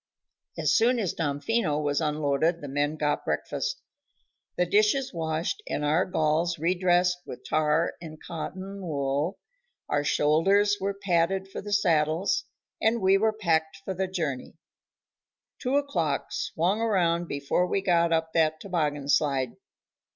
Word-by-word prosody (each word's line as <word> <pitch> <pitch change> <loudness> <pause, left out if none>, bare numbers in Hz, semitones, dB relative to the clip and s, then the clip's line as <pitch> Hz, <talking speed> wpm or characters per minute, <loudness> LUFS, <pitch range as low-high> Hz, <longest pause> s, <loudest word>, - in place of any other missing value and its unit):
As - - +2
soon 245 +2 +4
as 200 -7 -1
Damfino 150 +2 0
was 145 0 0
unloaded 150 +2 +1
the 145 - -6
men 145 +2 -1
got 150 -1 -1
breakfast. - - -3 0.7
The 180 - +3
dishes 215 +8 +2
washed 165 - -2
and 150 - -1
our 155 +5 +2
galls 165 0 0
redressed 180 +2 +2
with 125 0 -9
tar 155 +3 +1
and 155 -2 -9
cotton 190 +4 -6
wool, 145 +2 -1 0.5
our 145 0 0
shoulders 195 +9 +3
were 200 +1 -1
padded 190 0 0
for - - -6
the 205 - -7
saddles, 170 - +2 0.4
and 225 +1 +2
we 190 -1 +4
were 220 +1 +3
packed 165 -5 0
for 190 - -2
the 190 +1 -2
journey. 160 -9 -4 1.0
Two 255 +1 -1
o'clock 170 - -1
swung 185 +7 -1
around 175 -6 +1
before 140 +5 0
we 195 - 0
got 170 -3 +2
up 160 0 0
that 155 -1 +2
toboggan 150 -6 -2
slide. 135 -4 +2
170 Hz, 140 wpm, -27 LUFS, 150-195 Hz, 1.0 s, soon